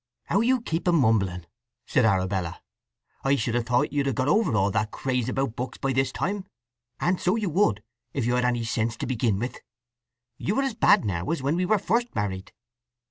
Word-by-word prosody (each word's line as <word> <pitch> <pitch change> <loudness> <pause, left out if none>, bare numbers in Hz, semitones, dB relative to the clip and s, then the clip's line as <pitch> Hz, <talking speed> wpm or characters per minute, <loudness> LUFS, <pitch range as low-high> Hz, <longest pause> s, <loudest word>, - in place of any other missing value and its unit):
"How 200 - +1
you 250 +1 +2
keep 165 -5 -3
a - - +5
mumbling!" 105 - +2 0.4
said - - +2
Arabella. 95 -4 0 0.6
"I 135 +1 +3
should 115 -2 -1
have 120 -1 0
thought 130 +5 +1
you'd 140 -1 +1
have 135 - 0
got 130 +3 0
over 215 - +3
all 100 -1 +2
that 105 +2 0
craze 125 -1 -2
about 135 -3 -1
books 125 0 -5
by 135 -1 -1
this 130 0 +1
time. 200 +4 -2 0.5
And 180 +1 0
so 180 +4 +2
you 210 -6 -1
would, 145 - +2 0.3
if 135 -5 -2
you'd 120 +1 +2
had 125 - +1
any 120 -1 +1
sense 115 0 -1
to - - -3
begin 120 -5 0
with. 120 +5 -4 0.8
You 210 +8 0
are - - +2
as 270 -3 -1
bad 205 -2 +4
now 85 -1 -2
as 165 -4 -1
when 140 +4 +1
we 180 +1 0
were 215 - +4
first 235 +5 -1
married." 95 -2 -3
130 Hz, 210 wpm, -26 LUFS, 110-175 Hz, 0.8 s, a